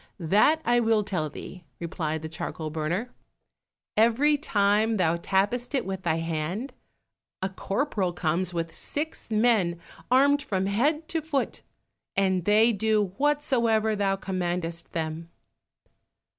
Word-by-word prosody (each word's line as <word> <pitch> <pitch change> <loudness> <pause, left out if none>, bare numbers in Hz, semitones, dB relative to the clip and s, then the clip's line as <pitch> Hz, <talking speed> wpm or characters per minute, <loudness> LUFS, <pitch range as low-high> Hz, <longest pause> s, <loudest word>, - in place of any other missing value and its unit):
"That 210 - +3
will 230 -2 +3
I - - -4
tell 175 -7 -2
thee," 180 +4 -9 0.2
replied 160 -2 -3
the - - -3
charcoal 160 -1 -5
burner; 170 +10 -2 0.8
"every 235 +7 +4
time 215 -5 +2
thou 170 -2 +2
tappest 205 - 0
it 260 - 0
with 190 -1 -4
thy 170 -4 +1
hand, 165 - -3 0.7
a 190 - 0
corporal 195 0 -1
comes 175 +1 -1
with 165 -1 -4
six 305 -1 -4
men 215 -6 +2 0.3
armed 280 +3 +4
from 190 -8 -1
head 290 +11 +1
to 325 - -1
foot, 295 -3 -2 0.5
and 190 -3 +1
they 215 +3 +5
do 210 -2 +1
whatsoever 235 -7 +2
thou 195 -1 +1
commandest 175 -3 -3
them." 160 0 -3
200 Hz, 130 wpm, -26 LUFS, 170-240 Hz, 0.8 s, they